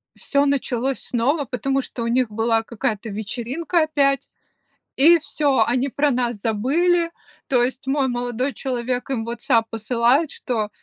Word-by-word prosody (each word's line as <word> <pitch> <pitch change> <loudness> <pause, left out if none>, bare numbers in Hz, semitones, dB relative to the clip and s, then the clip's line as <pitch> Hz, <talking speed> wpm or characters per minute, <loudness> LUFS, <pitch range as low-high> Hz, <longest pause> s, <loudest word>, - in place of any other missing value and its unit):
всё 280 0 +1
началось 270 -2 0
снова, 270 +6 0
потому 270 +3 -1
что 240 - -6
у - - -2
них 245 0 +1
была 225 +1 +1
какая-то 225 -1 -3
вечеринка 245 - -1
опять, 280 -3 +1 0.7
и 335 +5 +7
всё, 285 -6 +1
они 250 +3 +1
про 285 +2 +1
нас 245 -2 0
забыли. 305 - +1 0.4
То 250 -3 +3
есть 260 +2 -4
мой 275 0 +2
молодой 245 +2 -2
человек 250 -1 -3
им 235 -4 -1
в - - -10
"Ватсап" 230 -1 +1
посылает, 240 +6 +1
что: 220 -4 -2
250 Hz, 150 wpm, -22 LUFS, 235-280 Hz, 0.7 s, и